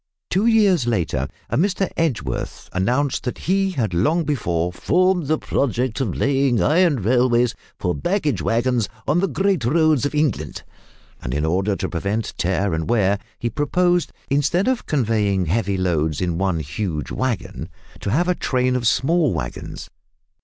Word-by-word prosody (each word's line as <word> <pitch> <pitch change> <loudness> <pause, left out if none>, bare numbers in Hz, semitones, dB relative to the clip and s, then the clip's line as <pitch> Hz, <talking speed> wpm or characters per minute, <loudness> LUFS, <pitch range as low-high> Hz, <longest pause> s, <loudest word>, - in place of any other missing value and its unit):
Two 195 +5 +2
years 200 - +4
later 80 - 0 0.2
a - - -2
Mr 190 +3 +1
Edgeworth 165 -7 -2
announced 125 +9 0
that 125 - -3
he 195 +1 +1
had 120 - -2
long 155 - +2
before, 90 - -1
"formed 180 - +1
the 155 +2 +2
project 125 -3 -1
of 110 -9 -1
laying 135 -3 +2
iron 155 - +3
railways 120 +1 +3 0.2
for 90 - -1
baggage 155 - -1
waggons 120 0 +1 0.2
on 150 +5 +3
the 195 - +2
great 190 -8 0
roads 155 +2 +3
of 145 +1 -1
England," 135 - -1 0.6
and, - - -4
in 75 +1 0
order 95 +5 +1
to - - -3
prevent 100 +6 -2
tear 95 +2 0
and 80 0 -2
wear, 100 -3 +2 0.2
he 120 - -2
proposed, 175 +6 +1 0.2
instead 145 - +1
of 260 -2 0
conveying 105 - +1
heavy 100 +2 0
loads 80 -5 0
in 85 -2 -1
one 95 -4 0
huge 75 +1 -4
waggon, 130 -4 -3 0.3
to - - -3
have 165 - +1
a 180 - +3
train 125 -6 0
of 120 -2 0
small 150 - +2
waggons. - - -6
125 Hz, 160 wpm, -21 LUFS, 95-155 Hz, 0.6 s, years